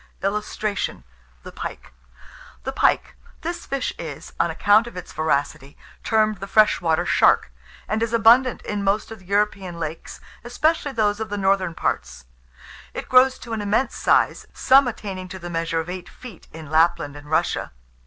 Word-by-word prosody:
[Illustration: 210 +1 -2 0.4
THE - - -9
PIKE.] - - -8 0.7
THE - - -3
PIKE. - - +1 0.3
This 340 +1 -5
fish 275 -1 -2
is, 155 -4 -8
on - - +2
account 205 +7 +3
of 235 - -10
its 180 - -8
voracity, 145 -2 -2 0.3
termed 215 -2 +1
the 195 - -6
freshwater 175 -6 +3
shark, - - +3 0.4
and 215 +1 -1
is 230 -1 0
abundant 235 +2 +4
in 205 -1 -3
most 200 +3 0
of 225 - -8
the 190 - -19
European 200 -3 -1
lakes, 160 0 -6 0.2
especially 290 +5 0
those 210 -3 +1
of 220 -1 -4
the 205 - -3
northern 190 -3 +1
parts. - - -3 0.7
It - - -6
grows 255 +1 +5
to 235 - -8
an 220 - -2
immense 205 +6 0
size, - - +2
some 265 0 +5
attaining 195 -5 -5
to 190 - -8
the 175 -1 -8
measure 165 0 -1
of 160 - -4
eight 180 0 -7
feet, 235 -9 -13
in 155 -2 -10
Lapland 155 -2 +2
and 145 0 -12
Russia. 160 +2 0
200 Hz, 165 wpm, -23 LUFS, 165-225 Hz, 0.7 s, grows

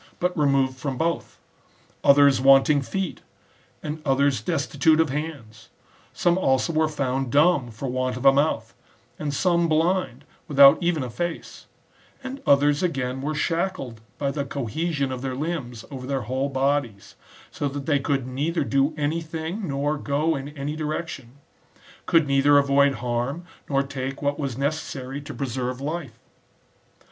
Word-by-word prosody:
but 180 +1 0
removed 135 -4 +2
from 135 -1 -3
both; 170 +4 -2 0.7
others 140 -2 +6
wanting 135 +2 +5
feet, 185 +8 -4 0.6
and 155 +1 -5
others 140 -2 +2
des 175 - -1
titute 155 +2 +2
of 160 -4 +2
hands; 140 -8 -6 0.4
some 175 +1 +1
also 135 +1 +1
were 155 0 +2
found 135 -4 -2
dumb 145 -3 +3
for 115 +4 -6
want 130 0 -2
of 125 - -6
a 135 - +8
mouth, 135 -6 0 0.5
and 150 -1 -2
some 170 +3 +1
blind 160 -4 0 0.2
without 140 +2 +7
even 170 -5 0
a 125 - -5
face; 175 +6 -5 0.6
and 265 +1 -6
others 145 +1 +4
again 130 -7 -2
were 150 +2 -2
shackled 165 - -2 0.2
by 140 -1 -1
the 140 0 -2
cohesion 140 +2 -2
of 130 -1 -5
their 130 -1 -3
limbs 135 -6 -4
over 130 -2 -7
their 135 -1 -1
whole 130 +5 -2
bodies, 135 -6 -1 0.4
so 145 - -2
that 140 0 -5
they 145 -2 +2
could 135 -2 -1
neither 145 +6 -1
do 140 +3 +1
any 155 +3 -1
thing, 165 +5 -5
nor 145 +1 -1
go 150 +4 0
in 135 +1 -5
any 145 +2 -3
direction; 155 -5 -5 0.7
could 165 -2 +4
neither 140 +1 +4
avoid 140 0 +3
harm, 125 +7 -3 0.2
nor 135 -1 +2
take 135 0 -5
what 145 0 -1
was 135 -5 -3
ne 140 +1 +2
cessary 140 -3 -6
to - - -8
preserve 125 -1 -3
life. 145 -4 -5
140 Hz, 155 wpm, -24 LUFS, 130-155 Hz, 0.7 s, a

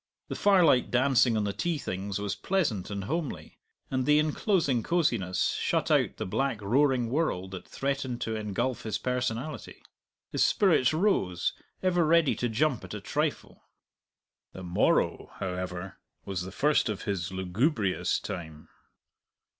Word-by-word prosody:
The - - -3
firelight 180 -11 +4
dancing 125 -2 +3
on 105 - +1
the 100 -1 -1
tea 165 - -1
things 100 -5 -4
was 100 -1 -2
pleasant 145 - -1
and 100 -1 -4
homely, 155 - -4 0.3
and 130 -1 0
the 150 0 +6
enclosing 155 - +1
cosiness 110 - +1
shut - - 0
out - - +2
the - - -3
black 135 +4 -1
roaring 125 +3 +2
world 110 - -1
that 95 -2 -8
threatened 135 -3 -2
to 110 - -2
engulf 110 +4 -2
his 110 -2 -2
personality. 125 +4 -3 0.5
His - - +2
spirits 165 - +3
rose, 155 - +1 0.3
ever 175 -2 +3
ready 165 -1 +4
to 120 - -1
jump 130 +2 0
at - - -7
a - - -4
trifle. - - -3 0.9
The 95 - -8
morrow, 90 0 +1
however, 90 0 -5 0.3
was 95 -2 -3
the 95 +1 -6
first 145 +2 +2
of 105 -2 -4
his 95 -3 -2
lugubrious 95 - 0
time. 80 -4 -7
120 Hz, 145 wpm, -28 LUFS, 95-150 Hz, 0.9 s, the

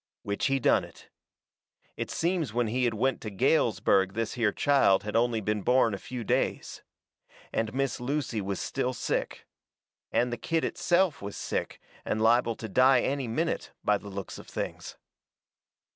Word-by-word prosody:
Which 100 +4 -1
he 135 0 +2
done - - +3
it. - - -14 0.9
It - - -4
seems 165 -9 -1
when 120 0 +2
he 125 +3 0
had 115 -2 0
went 130 +5 0
to 110 - -5
Galesburg 95 -1 +2
this 115 +1 -2
here 115 -4 +1
child 135 -7 +3
had 105 +1 -5
only 115 -1 +2
been 105 +1 -1
born 125 0 +3
a 100 - -4
few 125 +3 -6
days. - - -1 0.7
And 110 -1 0
Miss 135 0 -1
Lucy 125 -4 -2
was 100 -1 -3
still 130 -1 -2
sick. - - -3 0.7
And 120 0 +1
the - - -3
kid 165 +4 -1
itself 175 -2 +1
was 100 0 -6
sick, - - -3 0.2
and 110 - -1
liable 115 +1 +3
to 110 - -7
die 130 +4 +5
any 135 -2 -1
minute, 160 +9 -2
by 105 -1 +2
the 100 - -10
looks 100 -1 -6
of - - -12
things. - - -5
120 Hz, 170 wpm, -28 LUFS, 105-135 Hz, 0.9 s, die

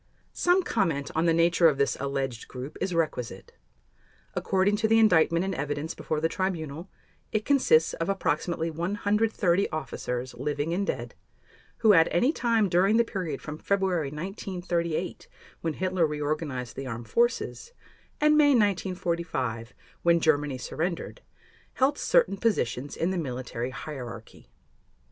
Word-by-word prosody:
Some 360 +2 +3
comment 165 - 0
on 160 +2 +1
the - - +5
nature 170 +1 +4
of 145 - -2
this 140 - +1
alleged 135 -3 -3
group 130 +4 -8
is 185 -2 -1
requisite. 125 - -2 0.8
According 195 +2 +1
to 220 +1 +1
the 225 +1 +4
Indictment 170 -5 +4
and 195 - -2
evidence 145 +2 -3
before 155 - -3
the 160 - +2
Tribunal, 165 -2 -3 0.4
it 215 -1 -1
consists 255 - +4
of 165 - -3
approximately 170 -4 -1
130 200 +2 +1
officers, 130 -5 -4
living 145 +5 -2
and 195 +3 -1
dead, - - -3 0.7
who 215 - +8
at 165 -3 +6
any 250 - +2
time 230 -6 +2
during 190 +5 +3
the 235 - +5
period 180 -10 -4
from 150 0 -6
February 190 -6 0
1938, 175 0 -3 0.3
when 165 -2 -1
Hitler 185 -1 +1
reorganized 150 -4 -3
the 135 - -5
Armed 115 -1 -6
Forces, 240 - 0 0.5
and 300 0 +4
May 290 -2 +5
1945, 170 - -1 0.3
when 170 0 +4
Germany 150 -4 +1
surrendered, 170 - -4 0.5
held 275 +2 +1
certain 480 - +3
positions 145 - -1
in 170 +3 0
the 185 - -1
military 125 -4 -4
hierarchy. 125 -5 -8
170 Hz, 140 wpm, -27 LUFS, 145-195 Hz, 0.8 s, who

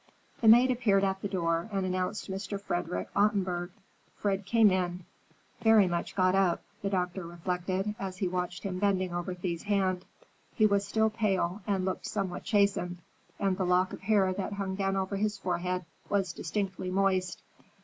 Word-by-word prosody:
The 225 - +3
maid 240 +4 +8
appeared 215 -6 +2
at 190 -1 0
the - - -2
door 170 -1 -1
and 195 -2 -1
announced 185 +3 -2
Mr. 195 +1 -4
Frederick 175 - -3
Ottenburg. 185 -4 +1 0.5
Fred 195 -1 -1
came 225 -3 +5
in, 180 -1 -1 0.6
very 220 -3 +6
much 170 -1 -3
got 185 -1 +3
up, 190 -3 +2 0.2
the 200 - -1
doctor 180 -1 -1
reflected, 180 +3 -2
as 190 -1 -4
he 185 - 0
watched 180 0 -3
him 185 -2 -3
bending 185 -3 +1
over 175 +1 -3
Thea's 175 -2 -3
hand. 190 -3 0 0.5
He 215 - +4
was 200 -1 +2
still 220 +1 +2
pale 200 -3 0
and 195 -3 0
looked 190 - -3
somewhat 190 -4 -3
chastened, 200 -4 +1 0.4
and 195 -2 +1
the 190 - -1
lock 180 +1 +2
of - - -8
hair 200 -2 +3
that 195 +2 -3
hung 195 -1 -3
down 195 0 0
over 195 +1 -1
his 210 0 0
forehead 180 -1 -2 0.2
was 195 -4 0
distinctly 190 0 -3
moist. 185 -1 0
190 Hz, 170 wpm, -30 LUFS, 180-200 Hz, 0.6 s, maid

